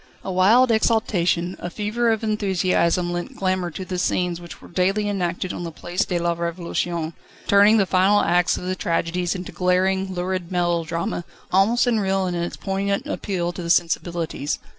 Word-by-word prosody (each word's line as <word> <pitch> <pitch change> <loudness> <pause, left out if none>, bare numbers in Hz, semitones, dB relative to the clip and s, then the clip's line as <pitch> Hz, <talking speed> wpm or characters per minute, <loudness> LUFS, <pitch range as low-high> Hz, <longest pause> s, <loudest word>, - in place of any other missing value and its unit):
A 190 - -4
wild 220 +7 +5
exaltation, 185 -6 +1
a 175 - -4
fever 215 +5 -1
of 225 0 0
enthusiasm 185 -4 +1
lent 175 0 -5
glamour 185 -2 0
to 185 +3 -7
the 185 -1 -3
scenes 180 -2 0
which 170 - -10
were - - -14
daily 195 +4 0
enacted 185 -2 -2
on - - -5
the 170 - -5
Place 175 +3 -2
de 180 - -1
la 170 0 +1
Revolution, 170 -1 -3 0.3
turning 205 +2 +6
the 200 - +3
final 190 +3 +3
acts 175 0 +2
of - - -7
the 185 +1 -2
tragedies 175 +1 -1
into 180 -1 -6
glaring, 190 +1 +1
lurid 185 0 -3
melodrama, 170 -1 -1 0.3
almost 205 +7 +3
unreal 195 -5 +1
in 180 - -2
its 170 0 -3
poignant 200 +1 -1
appeal 175 -4 -2
to 175 - -7
the 170 - -5
sensibilities. 170 -3 0
180 Hz, 170 wpm, -22 LUFS, 175-195 Hz, 0.3 s, turning